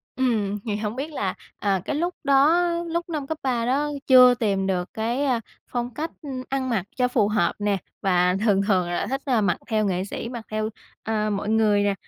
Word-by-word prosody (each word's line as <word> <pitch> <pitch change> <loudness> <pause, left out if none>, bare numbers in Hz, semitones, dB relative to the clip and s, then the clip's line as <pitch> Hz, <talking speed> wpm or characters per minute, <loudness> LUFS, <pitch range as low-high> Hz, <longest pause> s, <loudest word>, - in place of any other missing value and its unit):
Ừm, 215 -6 0
thì 210 - -1
hổng 210 +2 -3
biết 285 +4 -4
là, 195 -9 -1 0.3
à, 195 -3 +1
cái 295 - -2
lúc 345 +3 -1
đó, 300 +6 +4 0.2
lúc 340 +1 -2
năm 300 -4 -3
cấp 315 +1 -3
3 240 -3 0
đó 285 +4 +1 0.2
chưa 255 -1 +8
tìm 200 -5 0
được 180 -2 -1
cái, 235 +5 -1
à, 250 -4 +1 0.3
phong 245 -1 -3
cách, 320 +2 -4
ừm, 265 -4 -5
ăn 265 -1 -1
mặc 205 -7 0
cho 250 -1 +2
phù 210 -4 +2
hợp 210 -5 +1
nè, 205 -1 +1 0.2
và 180 -2 +3
thường 195 -2 +4
thường 185 -4 +2
là 175 - -1
thích, 270 +1 -2
à, 250 -6 +2
mặc 200 - +1
theo 215 -1 +1
nghệ 185 -1 0
sĩ 230 +3 -5
mặc 235 -3 -7
theo, 215 0 -1 0.3
à, 215 -1 0
mọi 205 0 -2
người 215 -2 +3
nè, 205 -1 +2
225 Hz, 220 wpm, -24 LUFS, 205-265 Hz, 0.3 s, chưa